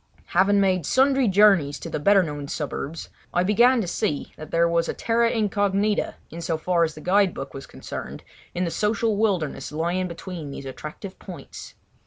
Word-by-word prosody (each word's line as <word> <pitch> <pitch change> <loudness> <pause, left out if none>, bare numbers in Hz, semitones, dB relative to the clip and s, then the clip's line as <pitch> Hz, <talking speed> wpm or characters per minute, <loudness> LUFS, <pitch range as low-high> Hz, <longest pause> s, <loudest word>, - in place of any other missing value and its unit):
Having 195 +3 +4
made 185 -5 +1
sundry 265 -1 +3
journeys 195 -8 +4
to - - -8
the - - -3
better 195 +5 +5
known 145 -3 -5
suburbs, 150 +1 -5 0.3
I 175 - +3
began 235 +6 +4
to 190 - -3
see 150 -4 -2
that 155 0 -10
there 170 0 +3
was 170 0 +1
a - - -2
terra 230 0 +2
incognita, 205 -2 0 0.2
in 170 - -7
so 165 -1 -1
far 170 +1 +1
as 160 -2 -1
the 155 - -10
guide 190 +1 +2
book 135 - -6
was 135 - -8
concerned, - - -8 0.3
in 180 - 0
the 170 - -2
social 210 +2 0
wilderness 180 -10 -1
lying 170 +4 -1
between 170 -3 -7
these 140 0 -8
attractive 150 +8 -8
points. 180 -3 -10
180 Hz, 185 wpm, -24 LUFS, 160-205 Hz, 0.3 s, better